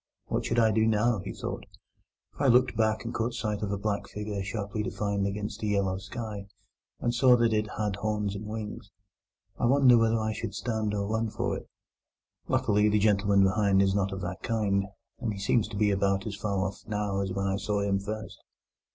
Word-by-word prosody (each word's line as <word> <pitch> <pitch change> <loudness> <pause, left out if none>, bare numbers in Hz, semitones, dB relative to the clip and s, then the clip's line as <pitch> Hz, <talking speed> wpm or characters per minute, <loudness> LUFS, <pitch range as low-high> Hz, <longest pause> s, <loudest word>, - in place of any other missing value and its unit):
"What - - -1
should 115 - -1
I 110 -2 +5
do 110 +1 +3
now," 110 0 +2
he 95 - -5
thought, - - -5 0.7
"if - - -10
I 140 - +4
looked 125 0 +4
back 110 0 +1
and 115 - -4
caught 115 +1 -1
sight 105 -3 -2
of 105 -2 -2
a 100 - -1
black 100 0 -2
figure 105 -1 -4
sharply 100 +1 -3
defined 100 -2 -1
against 105 +1 -4
the 105 - -2
yellow 100 -2 +1
sky, 105 -1 -6 0.5
and 120 - 0
saw 125 0 +6
that 115 -1 +2
it 105 0 +1
had 105 -2 -1
horns 105 -1 -1
and 105 +2 -6
wings? 110 0 -6 0.7
I 120 - +2
wonder 130 -2 +6
whether 115 0 +3
I 110 0 -1
should 100 -1 -5
stand 110 0 -1
or 100 0 -1
run 110 +2 -1
for - - -2
it. - - -9 0.8
Luckily, 105 +1 +3
the 105 - +3
gentleman 100 -1 +3
behind 95 0 +3
is 95 -1 +2
not 100 -1 0
of 95 0 -5
that 90 +1 -5
kind, 100 -4 0 0.3
and 115 -4 -2
he 100 - -7
seems 100 +2 +2
to 105 -2 -7
be 105 0 +3
about 100 0 +1
as 110 - -4
far 100 -1 -1
off 95 0 -5
now 105 -2 -1
as 95 -1 -2
when 95 +1 -2
I 95 0 0
saw 100 0 -1
him 100 -1 +1
first. 110 +2 -6
105 Hz, 210 wpm, -28 LUFS, 100-110 Hz, 0.8 s, saw